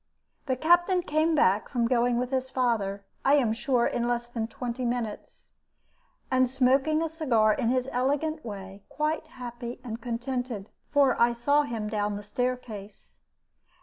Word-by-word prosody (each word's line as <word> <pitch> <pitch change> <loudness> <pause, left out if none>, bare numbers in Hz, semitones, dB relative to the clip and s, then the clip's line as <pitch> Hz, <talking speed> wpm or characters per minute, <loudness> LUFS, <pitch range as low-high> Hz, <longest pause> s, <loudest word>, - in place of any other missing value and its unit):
The 260 - +1
Captain 350 +5 +3
came 315 +1 +1
back 205 -7 +3
from 235 -3 +1
going 240 0 +2
with 250 +1 -2
his 260 -1 -1
father, 210 -6 0 0.2
I 275 - +5
am 245 -7 +2
sure, 245 0 +1
in 240 0 0
less 240 0 0
than 235 -2 -4
twenty 245 +2 -5
minutes, 235 -3 -4 0.8
and 255 -1 +3
smoking 270 +5 +2
a - - 0
cigar 250 -10 +2
in 225 - -1
his 255 0 +1
elegant 290 +5 0
way, 195 -2 -8
quite 310 +1 -1
happy 240 -4 -7
and 230 -2 -6
contented, 245 -3 -4 0.2
for 275 -5 +3
I 235 0 +5
saw 285 +5 +3
him 230 -7 -3
down 210 -1 -1
the 205 - -6
staircase. 220 -3 -5
245 Hz, 155 wpm, -27 LUFS, 230-275 Hz, 0.8 s, I